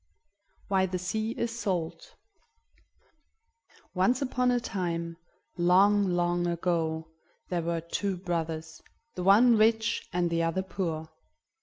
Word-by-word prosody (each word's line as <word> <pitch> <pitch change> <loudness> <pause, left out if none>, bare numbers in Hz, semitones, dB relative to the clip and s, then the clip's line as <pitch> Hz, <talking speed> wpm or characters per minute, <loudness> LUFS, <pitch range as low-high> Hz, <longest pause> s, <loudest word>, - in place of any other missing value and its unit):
WHY 190 -1 +2
THE 185 0 -3
SEA 215 +5 -2
IS 235 0 -2
SALT 170 -5 -3 1.8
Once 195 +7 +2
upon 250 -2 0
a 245 0 +2
time, 170 -7 -3 0.4
long, 195 +4 +4
long 175 0 +1
ago, 165 -2 -1 0.4
there 175 -2 0
were 170 0 -2
two 190 +3 -2
brothers, 160 -3 -4 0.3
the 180 - -5
one 220 +6 +6
rich 220 +1 +2
and 175 -1 0
the 165 0 +1
other 165 +3 0
poor. 165 -4 -4
180 Hz, 120 wpm, -28 LUFS, 170-205 Hz, 1.8 s, one